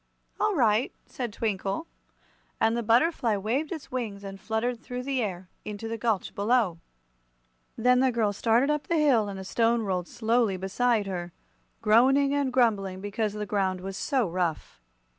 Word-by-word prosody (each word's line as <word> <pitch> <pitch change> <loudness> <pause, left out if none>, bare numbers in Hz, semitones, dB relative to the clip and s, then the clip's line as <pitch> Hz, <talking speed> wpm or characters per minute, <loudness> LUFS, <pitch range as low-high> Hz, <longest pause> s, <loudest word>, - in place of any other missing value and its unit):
"All 425 -2 +1
right," 230 -4 +2
said 245 -4 -5
Twinkle, 200 - -2 0.7
and 225 +1 +3
the 235 - 0
butterfly 235 -1 +2
waved 245 +10 -1
its 320 -5 -7
wings 220 -6 -4
and 195 -1 -8
fluttered 225 +3 -2
through 250 0 -5
the 270 -1 -1
air 185 -4 -4 0.2
into 210 +1 -6
the 225 - -3
gulch 225 -4 -1
below. 205 -5 +1 1.0
Then 250 +2 +4
the 260 0 +3
girl 220 -4 +1
started 235 +7 +2
up 300 -1 -2
the 340 - +1
hill 255 -9 +3
and 195 - -6
the 190 - -6
Stone 230 +3 +1
rolled 180 -3 -2
slowly 225 -3 +1
beside 210 +4 +1
her, 175 -3 -5 0.5
groaning 265 +6 +4
and 285 -2 0
grumbling 205 -7 +1
because 205 +1 -2
the 210 0 -4
ground 190 -3 0
was 190 +1 -6
so 260 -3 0
rough. 170 - -3
225 Hz, 165 wpm, -27 LUFS, 195-250 Hz, 1.0 s, Then